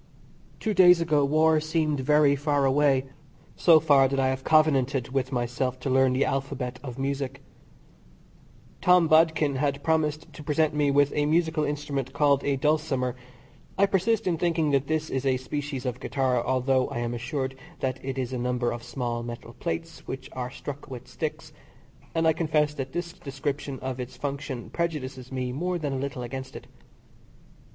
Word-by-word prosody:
Two 220 - -1
days 180 -2 +7
ago 155 -4 +2
war 155 +2 +4
seemed 155 -1 0
very 145 +1 +4
far 145 0 +1
away 135 -1 +3 0.5
so 165 -3 +6
far, 140 -4 +5
that 135 +1 -1
I 130 0 +2
have 130 0 -3
covenanted 140 -5 +3
with 130 0 -1
myself 125 +1 -2
to 135 - -2
learn 130 0 +4
the 130 +2 +2
alphabet 135 -2 -3
of 125 -3 -7
music. 135 0 -3 1.4
Tom 180 -2 +5
Bodkin 155 -3 +3
had 140 0 -1
promised 155 -1 0
to - - -10
present 150 +1 +1
me 150 -1 +2
with 145 0 +3
a 145 0 +1
musical 160 0 +1
instrument 145 -3 -3
called 140 -1 +3
a 140 - +1
dulcimer 140 -3 0 0.6
I 200 - +5
persist 205 +3 +1
in 170 -4 0
thinking 165 -3 +1
that 140 0 +1
this 155 0 -1
is 135 0 -1
a 130 -2 +2
species 140 +1 -4
of 125 -2 -3
guitar, 130 -3 0
although 130 0 +1
I - - -5
am 120 0 -2
assured 130 +3 -3 0.3
that 130 0 -2
it 135 0 -4
is 130 -1 -3
a 125 - -2
number 125 0 0
of 120 - -5
small 120 -1 -3
metal 120 0 -8
plates 165 +1 -5
which 130 0 -6
are 125 -1 -4
struck 145 +3 -8
with 125 -1 -8
sticks, - - -5 0.6
and 165 0 +2
I 160 - +5
confess 155 -2 +1
that 135 -2 -5
this 175 0 -3
description 140 -2 -4
of 130 -1 -4
its 125 +1 -6
function 140 -3 -5
prejudices 135 -7 -3
me 130 -1 -2
more 175 +7 -2
than 145 -4 -3
a 135 - -2
little 135 -2 -4
against 130 +2 -6
it. - - -8
140 Hz, 175 wpm, -26 LUFS, 130-155 Hz, 1.4 s, days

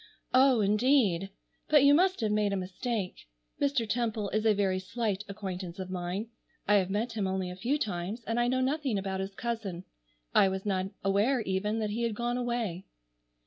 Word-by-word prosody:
"Oh, 255 -2 +5
indeed! 205 -3 +3 0.4
But 295 -2 +6
you 280 0 +7
must 370 +1 +3
have 215 -2 +1
made 210 -1 +1
a - - 0
mistake. 190 - -4 0.3
Mr. 275 -5 +1
Temple 220 -2 -1
is 215 +2 +1
a 215 - +6
very 190 -2 +1
slight 205 +1 -2
acquaintance 185 -3 -5
of 185 -1 -6
mine. 185 +5 -3 0.4
I 205 0 +6
have 190 -2 +1
met 220 +4 -1
him 210 -4 -1
only 190 -1 -2
a - - -7
few 245 +10 0
times, 205 0 -3
and 230 +2 -1
I 240 - +2
know 255 +1 +1
nothing 270 -3 0
about 190 -1 -3
his 195 +1 -4
cousin. 220 -7 -4 0.5
I 195 - +6
was 190 +1 -4
not 190 -2 0 0.2
aware 205 +7 +2
even 210 +2 -1
that 210 -1 -1
he 225 +3 -2
had 230 -2 0
gone 240 +2 -1
away." 235 -7 -2
210 Hz, 190 wpm, -30 LUFS, 190-240 Hz, 0.5 s, you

